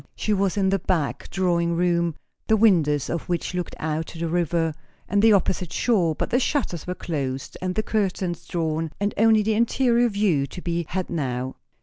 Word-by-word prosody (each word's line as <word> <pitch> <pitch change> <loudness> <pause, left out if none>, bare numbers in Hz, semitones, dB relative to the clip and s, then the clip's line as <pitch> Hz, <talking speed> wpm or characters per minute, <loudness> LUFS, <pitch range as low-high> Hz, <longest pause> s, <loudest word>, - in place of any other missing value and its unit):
She 215 - 0
was 195 -1 +1
in 195 -1 +2
the 195 0 +1
back 165 -5 -1
drawing 170 -2 +1
room, 170 -2 +1 0.3
the 220 - +4
windows 160 -10 +3
of 170 - -4
which 175 0 -1
looked 180 -2 -3
out 155 +1 -2
to - - -10
the 165 +1 -2
river 165 -1 0 0.3
and 200 +1 +2
the 225 +1 +6
opposite 180 -3 +1
shore; 180 -8 +2
but - - -3
the 245 - +3
shutters 245 - -1
were 180 - -2
closed 135 -7 -4
and 185 0 -2
the 215 - 0
curtains 190 -5 -2
drawn, 160 -2 -2
and 205 +1 0
only 220 0 +4
the 220 +1 +1
interior 235 +1 +3
view 195 -10 +1
to 180 - -8
be 170 -2 -2
had 185 +1 -3
now. 130 -5 -2
175 Hz, 195 wpm, -24 LUFS, 165-205 Hz, 0.3 s, the